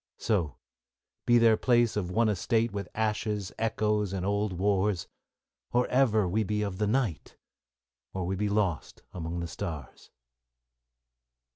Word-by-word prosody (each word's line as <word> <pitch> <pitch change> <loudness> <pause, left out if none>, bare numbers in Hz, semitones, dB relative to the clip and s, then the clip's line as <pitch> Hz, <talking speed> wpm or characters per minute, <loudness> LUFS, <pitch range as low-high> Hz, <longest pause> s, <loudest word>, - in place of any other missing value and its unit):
So, 85 - 0 0.7
be 120 - +6
their 115 -2 +5
place 120 -2 +3
of 95 -4 -1
one 110 +5 +2
estate 110 +3 +1
With 100 -2 -4
ashes, 105 -2 -1
echoes, 105 -2 0
and 95 -1 -2
old 100 +1 0
wars, 95 0 +1 0.3
— - - -58
Or 125 +1 +3
ever 110 -6 +3
we 110 +5 +1
be 105 +1 -1
of 100 -3 -4
the 105 - +1
night, 110 - -1 0.7
Or 95 -2 -3
we 95 +2 -1
be 105 +2 -1
lost 100 -6 -1
among 85 0 -4
the 85 - -3
stars. 80 -7 -7
105 Hz, 145 wpm, -29 LUFS, 95-110 Hz, 0.7 s, be